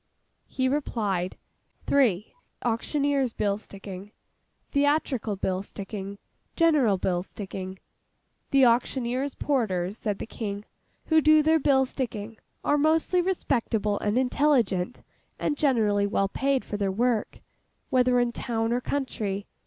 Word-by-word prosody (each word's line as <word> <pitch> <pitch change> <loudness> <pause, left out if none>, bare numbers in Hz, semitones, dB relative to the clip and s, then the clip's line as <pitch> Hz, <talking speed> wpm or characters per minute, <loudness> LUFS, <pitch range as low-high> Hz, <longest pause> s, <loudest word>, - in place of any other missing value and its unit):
He 260 -1 -1
replied, 210 -10 -1 0.5
three—auctioneers' 270 - 0
bill 205 -1 0
sticking, 195 -1 -9 0.6
theatrical 280 -6 +1
bill 190 -1 -1
sticking, 200 0 -7 0.4
general 295 - +4
bill 180 -1 0
sticking. 190 -1 -7 0.7
'The 275 -1 +5
auctioneers' 250 +2 +1
porters,' 210 -8 -1
said 210 -3 -2
the - - -5
King, 205 -2 -5 0.4
'who 315 -1 +4
do 310 0 +6
their 320 +1 +4
bill 270 -2 +3
sticking, 225 -4 -5 0.3
are 290 - +2
mostly 320 +4 +3
respectable 230 - 0
and 210 +3 0
intelligent, 250 -7 +1 0.3
and 295 - -1
generally 215 -8 +2
well 195 -1 +1
paid 270 +4 0
for 205 - -4
their 200 -2 0
work, 230 +2 0 0.5
whether 250 -1 +4
in 245 -1 +1
town 230 -1 -1
or 245 - 0
country. 215 -8 -3
235 Hz, 120 wpm, -26 LUFS, 200-275 Hz, 0.7 s, do